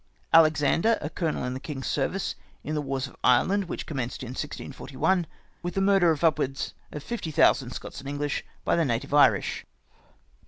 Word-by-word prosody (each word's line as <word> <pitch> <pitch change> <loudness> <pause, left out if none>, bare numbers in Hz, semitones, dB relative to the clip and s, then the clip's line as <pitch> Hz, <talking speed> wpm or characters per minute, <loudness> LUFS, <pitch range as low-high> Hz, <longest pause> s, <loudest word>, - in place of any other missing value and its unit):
" - - -35
Alexander, 165 +6 +5
a 150 - -5
colonel 160 -5 -2
in 125 0 -2
the 130 - -5
king's 135 -2 -6
service, 175 +7 -1 0.3
in 155 - -4
the 150 - 0
wars 135 -1 -2
of 130 - -12
Ireland, 180 +11 +3
which - - -5
commenced 130 -4 -4
in 125 - -6
1641, 145 +5 -2 0.3
with 175 0 -4
the - - +1
murder 195 -3 +4
of 160 0 0
up 160 -2 +4
wards 135 -1 -2 0.2
of 150 - -7
fifty 235 -6 -4
thousand 145 -4 +3
Scots 125 - -7
and 135 0 -7
English 145 0 -2 0.2
by - - +3
the 170 - +2
native 120 -1 -2
Irish. 130 -9 +4
150 Hz, 190 wpm, -27 LUFS, 135-165 Hz, 0.3 s, Alexander